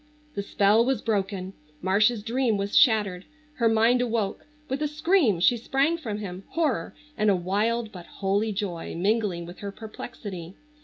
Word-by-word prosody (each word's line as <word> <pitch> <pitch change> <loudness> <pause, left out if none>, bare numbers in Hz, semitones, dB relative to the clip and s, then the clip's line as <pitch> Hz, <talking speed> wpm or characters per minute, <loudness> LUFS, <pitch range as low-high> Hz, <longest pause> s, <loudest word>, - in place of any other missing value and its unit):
The 200 - -2
spell 205 +2 +3
was 265 +1 +1
broken! 195 -3 -2 0.3
Marcia's 210 +4 +2
dream 230 -1 +1
was 200 +1 -3
shattered. 210 -8 +4 0.3
Her 230 -2 +3
mind 225 +3 +4
awoke. 230 -1 -2 0.2
With 265 +3 -3
a 300 - +1
scream 300 - +2
she 240 +7 +4
sprang 275 +7 +1
from 235 -11 -4
him, 190 -2 -6
horror 295 - -1 0.2
and 215 -1 +2
a 200 - +4
wild 215 +5 0
but 180 -4 -10
holy 200 +3 -1
joy 195 -5 -4
mingling 195 -1 0
with 175 +2 -11
her 200 -1 -5
perplexity. 200 -5 -8
215 Hz, 160 wpm, -26 LUFS, 195-235 Hz, 0.3 s, shattered